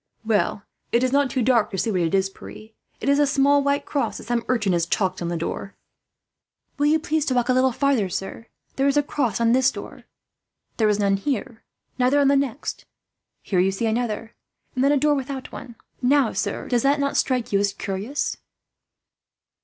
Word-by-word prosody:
"Well, 205 -2 0 0.3
it 235 +1 +2
is 255 - +1
not 280 0 +2
too 250 0 -1
dark 235 -3 +3
to 195 - -5
see 220 - 0
what 185 -3 0
it 165 +2 +1
is, 190 0 +2
Pierre. 215 +2 -12 0.3
It - - -5
is 280 +1 +4
a 290 - +4
small 280 +1 +3
white 280 0 0
cross 285 - -2
that - - -9
some 235 0 -1
urchin 215 -7 +1
has 170 -1 +1
chalked 185 -1 -1
on 170 - -2
the 170 0 -2
door." 180 +4 -5 1.0
"Will 290 - +3
you 310 +1 +4
please 315 0 -1
to 260 - 0
walk 245 0 +1
a - - +5
little 260 +1 +3
farther, 250 -6 +1
sir? 195 +5 -5 0.3
There 270 +1 +2
is 280 +1 +2
a 290 - +4
cross 250 -8 -1
on 230 0 +3
this 260 +1 +4
door. - - -10 0.7
There 220 -2 +3
is 210 - +2
none 200 -1 +2
here, 250 0 -3 0.4
neither 255 +3 +3
on 280 -1 +4
the 280 - +4
next. 275 -1 -2 0.6
Here 185 - 0
you 185 +2 +3
see 195 +4 -2
another, 225 0 -2 0.4
and 255 - 0
then 280 - +4
a 290 - +3
door 295 +2 +3
without 270 -1 -4
one. 240 -2 -9 0.3
Now, 265 -1 +3
sir, - - -3
does 240 -2 +1
not 280 +1 +3
that 280 0 -1
strike 250 -5 0
you 200 - +4
as 200 0 +1
curious?" 200 +8 -3
245 Hz, 210 wpm, -23 LUFS, 205-280 Hz, 1.0 s, a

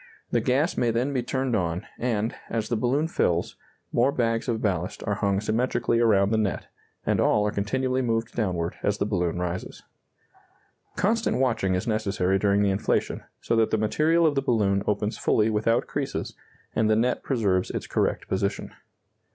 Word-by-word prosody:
The - - +2
gas 140 +7 +1
may 120 - +2
then 120 +5 0
be 130 - +1
turned 130 0 -1
on, 90 +1 -1
and, 115 -2 -1 0.2
as 110 -1 -2
the 120 - +1
balloon 130 +7 +1
fills, 85 - 0 0.4
more 125 +4 +3
bags 115 -3 0
of 115 -2 0
ballast 90 -4 -2
are 105 - 0
hung 100 -1 0
symmetrically 115 +2 0
around 105 -4 +3
the 110 - +2
net; 105 -3 -1 0.4
and - - +1
all 105 0 +3
are 105 - 0
continually 130 +6 -1
moved 115 -2 -1
downward 90 -6 -1
as 105 0 0
the 100 - 0
balloon 90 -5 -1
rises. 90 0 -4 1.1
Constant 225 +3 +1
watching 115 -8 +1
is 90 - -2
necessary 95 -4 0
during 100 +1 +2
the 100 - +2
inflation, 95 - 0 0.2
so - - 0
that 110 -1 +3
the - - +1
material 155 +10 +2
of 155 - +3
the 135 - +1
balloon 100 -6 +1
opens 105 +1 -1
fully 110 +1 +2
without 110 +2 +1
creases, - - -4 0.4
and 110 -1 +2
the 110 - +4
net 120 +3 +1
preserves 100 -8 0
its - - -4
correct - - -1
position. 100 +1 -2
110 Hz, 175 wpm, -26 LUFS, 100-125 Hz, 1.1 s, the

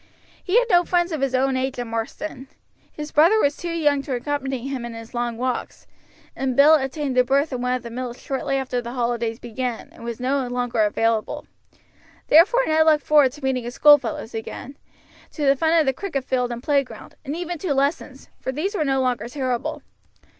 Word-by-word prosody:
He 380 +4 +2
had - - +4
no 350 0 +5
friends 350 0 +1
of 310 -4 -3
his 270 -1 0
own 265 +1 +1
age 260 0 -2
in 245 -1 -4
Marsden; 245 +5 -5 0.4
his 300 0 -7
brother 335 +9 +5
was 285 -6 +2
too 350 - -6
young 295 -4 +1
to 275 -2 -3
accompany 270 -1 -3
him 265 -3 -4
in 235 -1 -6
his 230 +1 -10
long 240 -1 -2
walks, 255 +1 -3 0.5
and 265 -2 -2
Bill 290 +4 +7
obtained 270 -2 0
a - - +6
berth 275 +3 +1
in 250 - -3
one 250 0 0
of 250 - -5
the 235 - -8
mills 245 0 -5
shortly 275 0 -2
after 255 -2 -2
the 240 0 -7
holidays 235 -2 -1
began, 240 0 -5
and - - -14
was 235 0 -5
no 260 +1 0
longer 245 -2 -1
available. 225 +1 -1 0.8
Therefore 395 +11 +6
Ned 315 0 +3
looked 305 -2 +4
forward 295 -4 +5
to 295 -1 -13
meeting 260 -2 0
his 240 +2 -6
schoolfellows 280 -6 +4
again, 225 +4 -7 0.6
to 300 - -2
the 275 0 +5
fun 320 +4 +1
of 310 - +2
the 265 - +2
cricket 285 -4 -4
field 250 -2 -1
and 240 +1 -6
playground, 280 -3 -1
and 285 +1 -4
even 350 -1 -4
to 360 -3 -2
lessons, 275 0 -1
for 260 - -3
these 325 - -2
were 385 - 0
no 270 -2 +1
longer 250 -2 -1
terrible. 255 -3 -3
265 Hz, 205 wpm, -23 LUFS, 245-295 Hz, 0.8 s, Bill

